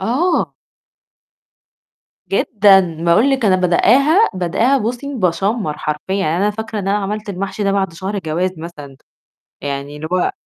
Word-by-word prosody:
آه. 285 - 0 1.8
جدًا، 190 -6 +3
باقُول 205 +11 +4
لِك 265 -3 0
أنا 190 -3 +4
بادءاها، 270 - +4
بادءاها، 195 +10 +1
بُصي 250 +5 -4
باشمّر 195 -3 -1
حرفيًا 150 +5 -3
يعني 170 -5 0
أنا 200 +3 +1
فاكرة 220 0 -5
إن 195 - -3
أنا 205 +1 +2
عملت 210 +2 -4
المحشي 195 +2 -4
ده 200 - +1
بعد 190 -3 0
شهر 190 +5 -4
جواز 175 +1 -1
مثلًا 150 -5 -9 0.7
يعني 140 +1 -5
اللي 155 +1 -6
هو 185 - +1
195 Hz, 145 wpm, -18 LUFS, 170-220 Hz, 1.8 s, باقُول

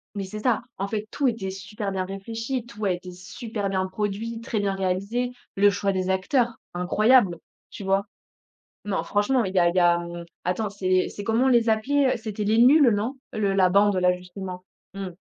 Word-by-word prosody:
Mais 200 -1 -3
c'est 215 +3 -7
ça, 230 0 +1 0.2
en 195 - -2
fait, 215 0 -3
tout 280 +3 0
était 225 -6 -1
super 195 +2 -5
bien 190 -1 -2
réfléchi, 225 +6 -4
tout 215 -3 -6
a 190 - +2
été 180 0 -5
super 205 +3 -5
bien 190 -1 0
produit, 210 +4 -3
très 230 -2 -2
bien 200 -1 0
réalisé, 195 +7 -1 0.2
le 205 +1 +5
choix 200 +1 0
des 185 -1 -1
acteurs 230 +5 +1 0.2
incroyable, 200 +2 +3 0.3
tu - - -8
vois? 195 +1 +1 0.8
Non 205 -2 -1
franchement, 220 +4 +1
il 190 -1 -4
y - - +4
a 175 - +5
il 170 - -2
y - - +4
a 175 -1 +4 0.4
attends 185 +5 -1
c'est, 185 -2 +1
c'est 205 - -7
comment 225 +4 +2
on - - +4
les 235 -2 +4
appelait, 260 +5 +2
c'était 215 -2 -5
Les 215 +2 +2
Nuls, 260 +2 +7
non? 220 +7 -1 0.2
Le 205 -2 0
la 185 -2 +4
bande 200 +1 +4
là, 180 0 +4
justement. 180 0 -8 0.3
Mmh. 195 -2 -5
200 Hz, 200 wpm, -25 LUFS, 190-225 Hz, 0.8 s, Nuls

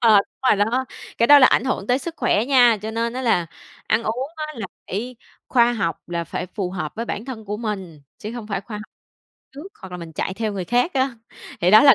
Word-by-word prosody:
Ờ, 225 -3 +6
đúng 200 - -3
rồi - - +5
đó, 235 +6 +1 0.3
cái 235 - +4
đó 290 +2 +9
là 260 - +8
ảnh 250 - +3
hưởng 205 -6 -1
tới 250 +3 +2
sức 330 +3 -6
khỏe 210 - +2
nha. 245 -3 +5
Cho 220 - -3
nên 230 +1 -1
á 255 +1 -4
là 180 -9 +2 0.4
ăn 220 +2 +2
uống 250 +5 -2
á 310 -1 -3
là 225 - -4 0.2
phải 235 +5 -4 0.3
khoa 240 -2 +4
học, 180 -9 -1
là 170 -1 -2
phải 170 - -4
phù 185 -1 -4
hợp 175 -5 -4
với 230 - -2
bản 225 -1 -4
thân 245 -5 -7
của 210 0 -3
mình, 190 -9 -5 0.2
chứ 215 - -6
hông 235 -3 -7
phải 195 -3 -2
khoa 210 +2 -8
học 210 - -6 0.7
trước 295 +7 -9
hoặc 190 -2 -10
là - - -4
mình 165 -1 -8
chạy 185 +4 -3
theo 215 0 -2
người 190 -2 -3
khác 245 - +1
á. 265 -1 +1 0.5
Thì 175 +2 +4
đó 215 - +9
là 275 -3 +9
220 Hz, 250 wpm, -22 LUFS, 195-250 Hz, 0.7 s, đó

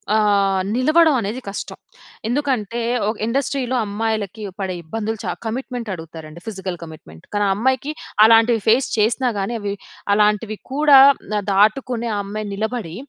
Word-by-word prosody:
ఆహ్, 200 -3 +2
నిలవడం 310 +4 +4
అనేది 220 +5 -4
కష్టం. 200 - -6 0.5
ఎందుకంటే, 240 -4 -1 0.3
ఒక 220 - -2
ఇండస్ట్రీలో 260 +1 -1
అమ్మాయిలకి 215 0 -3 0.2
పడే 190 -2 -2
ఇబ్బందులు 220 +6 -4
చ - - -2
కమిట్మెంట్ 245 0 -4
అడుగుతారండి. 160 -1 -9
Physical 190 -4 -5
commitment. 155 - -12
కానీ 205 0 +1
ఆ - - +3
అమ్మాయికి 260 +6 0 0.3
అలాంటివి, 225 0 +5
ఫేస్ 240 +4 +4
చేసినా 235 +4 +2
గానీ 195 +5 -2
అవి, 200 -1 -2 0.4
అలాంటివి 210 +1 +1 0.2
కూడా 290 -1 +6 0.4
ఆహ్, 200 - -7
దాటుకునే 230 +4 +2
ఆ - - -1
అమ్మాయి 210 +1 -5
నిలబడి. 215 -4 -3
220 Hz, 140 wpm, -20 LUFS, 200-245 Hz, 0.5 s, కూడా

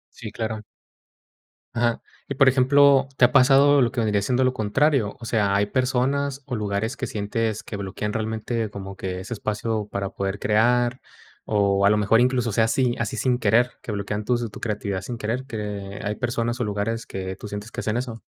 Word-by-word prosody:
Sí, 115 -3 -7
claro. 110 0 -4 1.1
Ajá. 120 0 0 0.3
Y, 140 - -4
por 135 -1 +6
ejemplo, 135 +1 +5
¿te - - +2
ha 120 - +2
pasado, 140 +2 +6
lo 120 - +2
que 125 - 0
vendría 105 -2 +1
siendo 125 +5 +1
lo 130 0 +2
contrario? 115 +1 +1
O - - -7
sea, 105 -4 +1
¿hay 100 +1 +2
personas 135 +3 0
o 125 - -3
lugares, 105 +3 -2
que 130 - -3
sientes 110 +1 -2
que 105 - -6
bloquean 100 +2 -4
realmente, 110 0 -2
como 95 -1 -8
que, 95 -1 -4
ese 110 +5 -6
espacio 105 0 -2
para 100 -1 -3
poder 100 0 -3
crear? 120 +4 +2 0.5
O 100 -2 +2
a - - +6
lo 105 - +4
mejor, 105 +2 +3
incluso, 125 -1 +2
o - - -4
sea, 110 +2 +3
así 120 +1 +1
así 115 -2 -2
sin 125 -2 +1
querer, 115 +2 +3
que 120 - -6
bloquean 105 +1 -3
tus 120 -1 0
tu - - -10
creatividad 100 -3 -3
sin 120 +5 -6
querer, 120 +5 -3
que 105 -4 -5
hay 105 +1 -2
personas 120 0 -2
o - - +1
lugares 105 +3 -2
que 95 -1 -5
tú 105 - -8
sientes 105 +2 -7
que - - -6
hacen 110 +1 -1
eso. 120 -3 -5
110 Hz, 205 wpm, -24 LUFS, 105-125 Hz, 1.1 s, por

